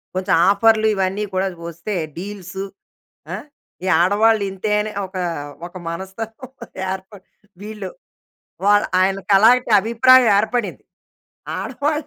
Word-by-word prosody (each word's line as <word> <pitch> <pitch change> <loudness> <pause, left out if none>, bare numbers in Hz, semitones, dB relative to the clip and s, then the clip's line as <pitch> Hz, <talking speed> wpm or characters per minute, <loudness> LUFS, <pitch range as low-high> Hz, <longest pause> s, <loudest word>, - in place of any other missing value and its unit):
కొంచెం 185 0 0 0.2
ఆఫర్లు 220 +2 +4
ఇవన్నీ 195 +2 -1
కూడా 190 +1 +1 0.2
వస్తే 170 +6 -6 0.2
డీల్సు 190 0 -6 0.7
ఆహ్, - - -6 0.4
ఈ - - -2
ఆడవాళ్ళు 210 +4 +3
ఇంతే 195 +3 -3
అని 215 0 -4 0.2
ఒక 190 0 -9 0.5
ఒక 175 - -20
మనస్తత్వం 215 +8 -7 0.4
ఏర్పడి 190 0 -8 0.4
వీళ్ళు 210 -2 -7 0.8
వాల 205 +1 +5 0.2
ఆయనకి 195 +1 0
అలాంటి 245 +3 +4
అభిప్రాయం 240 +3 +5
ఏర్పడింది. 235 +3 -2 0.7
ఆడవాళ్ళు 300 +1 -2
205 Hz, 110 wpm, -20 LUFS, 190-225 Hz, 0.8 s, వాల